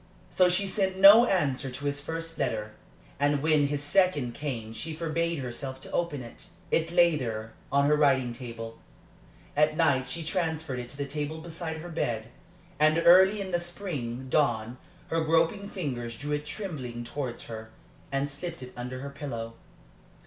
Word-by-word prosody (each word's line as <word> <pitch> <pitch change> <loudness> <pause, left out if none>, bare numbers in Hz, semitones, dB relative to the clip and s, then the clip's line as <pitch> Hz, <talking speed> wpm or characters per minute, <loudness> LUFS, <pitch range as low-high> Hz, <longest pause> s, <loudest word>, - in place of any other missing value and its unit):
So 185 -1 +4
she 180 +3 +2
sent 190 -1 0
no 205 +5 +9
answer 145 - +1
to 130 +3 -6
his 145 0 -1
first 165 +2 -5
letter, 110 -4 -1 0.5
and 145 0 +2
when 155 -2 +4
his 145 0 -2
second 145 -6 +2
came 115 -7 -4
she 160 +6 -5
forbade 165 +1 -1
herself 130 0 -5
to - - -10
open 160 -6 -1
it. 120 +8 -11 0.2
It 165 0 +2
lay 170 -1 +5
there 115 -5 -4 0.2
on 140 0 +4
her 150 +1 +4
writing 130 -5 +3
table. 115 -2 -7 0.8
At 150 +1 +3
night 140 -5 +3
she 165 +6 -3
transferred 160 -5 -2
it 120 0 -6
to 140 - -9
the 140 - -2
table 150 +2 -3
beside 160 0 -5
her 175 - -8
bed, 115 -9 -2 0.5
and 155 +1 +5
early 190 +4 +7
in 190 -1 -5
the 175 - +1
spring 150 -9 -4
dawn 125 -4 +1 0.3
her 165 0 +1
groping 165 +6 +2
fingers 120 - -4
drew 145 +1 -5
it 150 0 -2
trembling 140 - -5
towards 125 0 -5
her 110 -1 -8 0.4
and 135 +1 0
slipped 145 +1 -6
it 125 - -10
under 125 +1 -5
her 140 0 -6
pillow. 120 -6 -5
145 Hz, 170 wpm, -28 LUFS, 125-165 Hz, 0.8 s, no